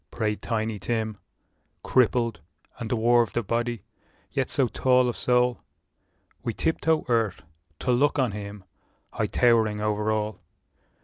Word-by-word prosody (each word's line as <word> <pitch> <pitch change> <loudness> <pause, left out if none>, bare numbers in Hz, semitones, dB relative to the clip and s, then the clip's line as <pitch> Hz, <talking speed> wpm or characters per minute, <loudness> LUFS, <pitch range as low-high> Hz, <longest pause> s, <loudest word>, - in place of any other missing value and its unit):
" - - -51
prayed 105 -2 -2
Tiny 110 -2 -2
Tim, 110 0 -2 0.6
Crippled, 120 -5 +2 0.4
and 115 - -4
dwarfed 120 -2 +2
of 120 - 0
body, 120 0 -1 0.5
yet - - -1
so 135 - +2
tall 125 +1 +3
Of 120 - -2
soul, 125 0 +2 0.8
we 115 - -3
tiptoe 160 -1 +1
earth 115 -5 0 0.4
to 125 - +1
look 140 +4 +3
on 130 -5 +2
him, 100 -1 -7 0.5
High - - -1
towering 110 -3 +3
over 105 0 0
all. 110 0 -2
115 Hz, 135 wpm, -26 LUFS, 105-125 Hz, 0.8 s, tall